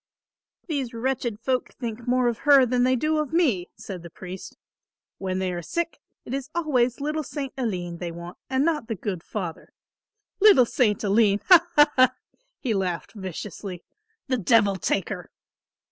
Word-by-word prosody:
"These 270 -7 -3
wretched 240 -2 -2
folk 255 +1 -1
think 235 -1 -6
more 250 0 +3
of 235 -1 -1
her 280 -3 +6
than 250 0 +1
they 255 +1 +3
do 310 +4 +1
of 300 -2 -2
me," 270 - +1
said 185 -4 -8
the 170 - -10
priest. 185 +2 -9 0.6
"When 185 -1 -2
they 185 -1 -1
are 175 - -4
sick, 340 - -3 0.3
it 240 - -6
is 275 0 -3
always 255 -7 +1
little 300 +2 -1
St. 280 -2 -5
Aline 180 -9 -3
they 175 -2 -4
want 170 +1 -9
and 265 +2 +2
not 305 -7 0
the 225 - -2
good 185 -2 -4
Father, 175 -3 -6 0.7
'Little 390 - +7
St. 225 -4 +1
Aline,' 205 0 +3
ha, 345 -2 +8
ha, 295 -1 +6
ha!" 255 0 +5 0.4
he 240 - -1
laughed 185 -4 -2
viciously. 190 -1 -7 0.4
"The 260 -2 +1
devil 205 -1 +4
take 190 0 -1
her." 180 -5 -6
235 Hz, 170 wpm, -25 LUFS, 190-270 Hz, 0.7 s, ha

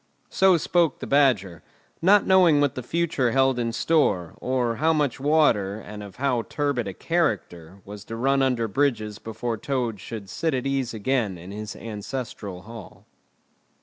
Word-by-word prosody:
So 190 -2 +4
spoke 170 +1 +1
the - - -7
Badger, 110 - +2 0.4
not 195 +4 +5
knowing 180 -6 +5
what 145 -2 +2
the 130 - -5
future 145 -3 0
held 135 -1 +3
in 115 -1 -1
store, 115 - +1
or 125 -3 0
how 160 +2 +2
much 145 -5 0
water, 130 -9 +2
and 105 -1 -9
of 100 -2 -10
how 130 -3 0
turbid 140 -7 -1
a 95 - -4
character, 100 - -2
was 105 0 -9
to 115 - -6
run 135 +4 +1
under 125 -4 +1
bridges 110 -3 -1
before 115 +1 -4
Toad 125 -5 -2
should 105 0 -8
sit 155 +9 -1
at 125 - -3
ease 135 -4 -1
again 110 -3 -1
in 90 +3 -10
his 105 0 -6
ancestral 105 -3 -6
Hall. 115 -2 -12
120 Hz, 165 wpm, -24 LUFS, 105-145 Hz, 0.4 s, not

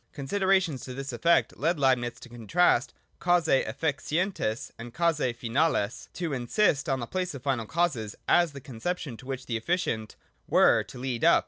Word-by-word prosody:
Considerations 185 0 +1
to 125 - -7
this 135 0 -5
efifect 170 +8 +2
led 165 +4 +1
Leib 130 -2 +4
nitz 120 0 -5
to - - -10
contrast 120 - +2 0.3
causae 175 -6 +3
efficienies 150 - -2
and 120 +1 -9
causae 150 -8 +1
finales, 120 -2 0
and - - -40
to 170 -5 -3
insist 145 - +1
on 135 -1 +1
the 120 - -3
place 185 +2 -3
of 130 - -9
final 130 -6 -1
causes 140 -10 -1
as 175 -2 +4
the 140 - -9
conception 135 +2 -4
to 120 +4 -13
which 130 -1 -5
the 115 - -2
efficient 115 -5 -2 0.3
were - - +5
to - - -11
lead 125 -2 -3
up. - - +6
135 Hz, 180 wpm, -28 LUFS, 120-170 Hz, 0.3 s, up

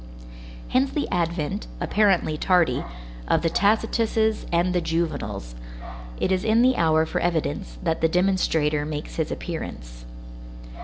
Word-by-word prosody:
Hence 265 +2 +2
the 295 - -2
advent, 170 +3 -2
apparently 195 -7 +2
tardy, 170 -5 +2 0.4
of - - +2
the 165 - +1
Tacituses 220 +1 +1
and 175 +2 +2
the 180 - +1
Juvenals; 165 - -3 0.7
it - - 0
is 185 0 +1
in 225 +2 +3
the 255 0 +4
hour 160 -3 +3
for - - -2
evidence, 170 +1 -2
that 165 -2 -1
the 165 - +3
demonstrator 160 -5 +1
makes 150 0 -6
his 160 -2 -1
appearance. - - -6
170 Hz, 135 wpm, -24 LUFS, 155-200 Hz, 0.7 s, the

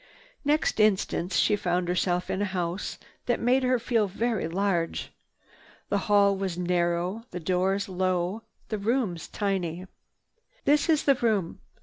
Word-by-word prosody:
Next 300 -4 +1
instant 195 -3 +2
she 185 +5 +3
found 180 -2 -1
herself 180 0 0
in 190 - -1
a - - +2
house 175 +3 -3 0.3
that 240 - +1
made 250 +3 +3
her 255 0 +2
feel 230 -3 +1
very 220 -1 -1
large. 175 -1 -1 0.8
The 200 - +1
hall 200 -1 +5
was 190 -3 -3
narrow, 180 +4 0
the 180 - -5
doors 185 +3 0
low, 185 +2 -1 0.3
the 215 - -2
rooms 210 -6 -1
tiny. 185 -3 -2 0.8
"This 295 +2 +3
is 310 -2 +3
the 280 - +5
room." 215 -9 0
195 Hz, 140 wpm, -27 LUFS, 180-225 Hz, 0.8 s, hall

